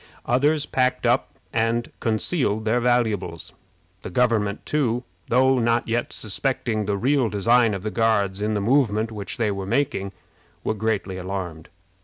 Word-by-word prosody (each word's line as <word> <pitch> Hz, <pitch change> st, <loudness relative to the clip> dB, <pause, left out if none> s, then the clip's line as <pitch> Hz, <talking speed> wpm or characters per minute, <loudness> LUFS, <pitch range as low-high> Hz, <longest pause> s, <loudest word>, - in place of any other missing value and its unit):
Others 145 Hz, +5 st, +2 dB
packed 130 Hz, -2 st, 0 dB
up -, -, +2 dB, 0.2 s
and 115 Hz, +1 st, 0 dB
concealed 110 Hz, -1 st, 0 dB
their 115 Hz, +3 st, +2 dB
valuables. 110 Hz, -9 st, 0 dB, 0.5 s
The -, -, -6 dB
government, 110 Hz, -1 st, +1 dB
too, 125 Hz, -5 st, 0 dB, 0.2 s
though 130 Hz, +1 st, +4 dB
not 115 Hz, 0 st, +1 dB
yet 120 Hz, +1 st, -1 dB
suspecting 110 Hz, 0 st, -2 dB
the 100 Hz, 0 st, 0 dB
real 130 Hz, +1 st, +2 dB
design 110 Hz, +2 st, +3 dB
of 95 Hz, -, -6 dB
the 110 Hz, -, -2 dB
Guards 105 Hz, -4 st, +1 dB
in 105 Hz, +1 st, 0 dB
the 105 Hz, -, 0 dB
movement 115 Hz, -2 st, +2 dB
which 100 Hz, -3 st, -6 dB
they 110 Hz, -3 st, +1 dB
were 100 Hz, -1 st, -4 dB
making, 115 Hz, -6 st, 0 dB, 0.5 s
were -, -, 0 dB
greatly 105 Hz, -3 st, -2 dB
alarmed. 90 Hz, -4 st, -5 dB
110 Hz, 150 wpm, -23 LUFS, 100-125 Hz, 0.5 s, though